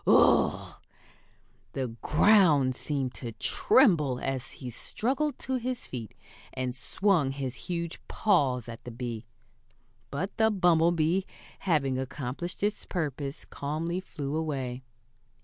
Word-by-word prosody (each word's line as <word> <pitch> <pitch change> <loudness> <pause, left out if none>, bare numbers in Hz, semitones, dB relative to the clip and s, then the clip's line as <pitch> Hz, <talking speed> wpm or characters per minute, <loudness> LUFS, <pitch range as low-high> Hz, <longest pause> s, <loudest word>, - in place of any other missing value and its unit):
Whoof!" - - +4 0.9
The 130 -2 -2
ground 155 -8 +5
seemed 135 -1 -2
to 120 -3 -6
tremble 150 - +3
as 135 -1 -3
he 125 -3 -7
struggled 265 - -1
to 260 -1 -2
his 250 0 -3
feet, 115 -5 -7 0.4
and 130 -1 -2
swung 175 +1 +2
his 135 -3 -3 0.2
huge 170 -1 -3
paws 135 - +2
at 115 -1 -8
the 125 - -7
bee. 115 -1 -5 0.8
But 160 +8 -3
the 220 -1 +5
bumblebee, 175 -2 +3 0.4
having 140 -8 +1
accomplished 140 +7 -5
its 210 0 0
purpose, 145 -4 -3
calmly 160 +5 -3
flew 150 -6 -5
away. 135 -6 -2
150 Hz, 115 wpm, -29 LUFS, 130-180 Hz, 0.9 s, ground